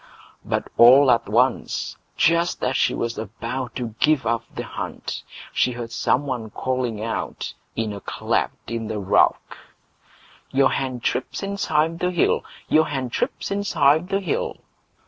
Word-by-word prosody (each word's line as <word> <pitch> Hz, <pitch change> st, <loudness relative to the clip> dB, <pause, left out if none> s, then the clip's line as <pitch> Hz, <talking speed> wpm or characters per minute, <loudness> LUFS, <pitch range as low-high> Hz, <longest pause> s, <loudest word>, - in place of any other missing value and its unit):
But -, -, -2 dB
all 130 Hz, +3 st, +8 dB
at 115 Hz, -4 st, +2 dB
once, 125 Hz, +4 st, +1 dB, 0.2 s
just 170 Hz, +2 st, +2 dB
as 130 Hz, +1 st, +1 dB
she -, -, +2 dB
was 115 Hz, -1 st, -2 dB
about 115 Hz, +3 st, -5 dB
to 120 Hz, -4 st, -4 dB
give 150 Hz, -5 st, +3 dB
up 115 Hz, 0 st, 0 dB
the -, -, -3 dB
hunt, -, -, -5 dB, 0.3 s
she 125 Hz, -, +2 dB
heard 120 Hz, -1 st, -6 dB
some 130 Hz, +4 st, +1 dB
one 120 Hz, -5 st, -3 dB
calling 125 Hz, -2 st, -2 dB
out 115 Hz, -, -3 dB, 0.2 s
in 110 Hz, -2 st, -1 dB
a 100 Hz, -, -7 dB
cleft -, -, -2 dB
in 115 Hz, -1 st, -3 dB
the 110 Hz, -, -3 dB
rock: 100 Hz, -1 st, +2 dB, 0.9 s
Your 135 Hz, 0 st, +3 dB
hen 130 Hz, -2 st, -2 dB
trips 125 Hz, +10 st, -2 dB
inside 165 Hz, -5 st, 0 dB
the 180 Hz, -, +1 dB
hill! 175 Hz, -2 st, +2 dB, 0.2 s
Your 155 Hz, 0 st, +4 dB
hen 130 Hz, -4 st, -3 dB
trips -, -, -2 dB
inside 170 Hz, -4 st, +2 dB
the 195 Hz, 0 st, 0 dB
hill! 175 Hz, -6 st, -2 dB
130 Hz, 150 wpm, -23 LUFS, 115-155 Hz, 0.9 s, all